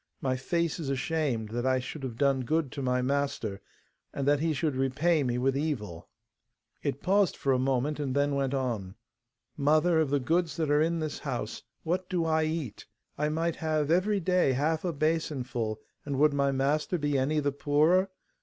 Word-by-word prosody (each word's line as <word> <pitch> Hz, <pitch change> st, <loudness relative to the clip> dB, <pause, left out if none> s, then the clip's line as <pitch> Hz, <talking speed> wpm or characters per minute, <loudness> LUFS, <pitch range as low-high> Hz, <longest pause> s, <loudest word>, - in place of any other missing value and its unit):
My 130 Hz, -1 st, 0 dB
face 170 Hz, +5 st, -1 dB
is 150 Hz, -4 st, -3 dB
ashamed, 135 Hz, -5 st, -1 dB
that 120 Hz, +2 st, -3 dB
I 130 Hz, 0 st, +2 dB
should 130 Hz, +4 st, -6 dB
have 125 Hz, -4 st, -5 dB
done 140 Hz, 0 st, +2 dB
good 150 Hz, +1 st, 0 dB
to 140 Hz, -, -5 dB
my 125 Hz, -1 st, +1 dB
master, 130 Hz, -7 st, -1 dB, 0.5 s
and 140 Hz, 0 st, -3 dB
that 145 Hz, 0 st, +4 dB
he 160 Hz, +1 st, +1 dB
should 150 Hz, -1 st, -1 dB
repay 145 Hz, +5 st, +2 dB
me 125 Hz, -3 st, 0 dB
with 135 Hz, +2 st, +1 dB
evil.' 125 Hz, -, -3 dB, 0.7 s
It 135 Hz, -, -3 dB
paused 195 Hz, 0 st, +2 dB
for 135 Hz, -, +1 dB
a 130 Hz, -, +2 dB
moment, 135 Hz, +3 st, 0 dB
and 140 Hz, -3 st, -2 dB
then 145 Hz, 0 st, +2 dB
went 140 Hz, -1 st, 0 dB
on, 115 Hz, -8 st, -2 dB, 0.6 s
'Mother, 155 Hz, +3 st, +3 dB
of 155 Hz, -3 st, +1 dB
the 145 Hz, 0 st, +2 dB
goods 160 Hz, +3 st, 0 dB
that 155 Hz, -3 st, 0 dB
are 145 Hz, +1 st, +4 dB
in 165 Hz, +1 st, +1 dB
this 155 Hz, -2 st, -3 dB
house, -, -, -4 dB, 0.2 s
what 180 Hz, +3 st, -1 dB
do 175 Hz, -3 st, 0 dB
I 160 Hz, -1 st, +2 dB
eat? 155 Hz, -7 st, -4 dB, 0.3 s
I 150 Hz, +1 st, 0 dB
might 165 Hz, +2 st, -1 dB
have 155 Hz, -1 st, 0 dB
every 200 Hz, +4 st, +2 dB
day 180 Hz, -6 st, +2 dB
half 155 Hz, +4 st, 0 dB
a 180 Hz, -, 0 dB
basinful, 135 Hz, -8 st, -1 dB, 0.2 s
and 140 Hz, -2 st, -3 dB
would 150 Hz, +1 st, +4 dB
my 140 Hz, -1 st, +2 dB
master 145 Hz, +6 st, 0 dB
be 145 Hz, -2 st, -1 dB
any 140 Hz, +3 st, +1 dB
the 145 Hz, -1 st, 0 dB
poorer? 155 Hz, +7 st, +3 dB
145 Hz, 190 wpm, -29 LUFS, 130-160 Hz, 0.7 s, that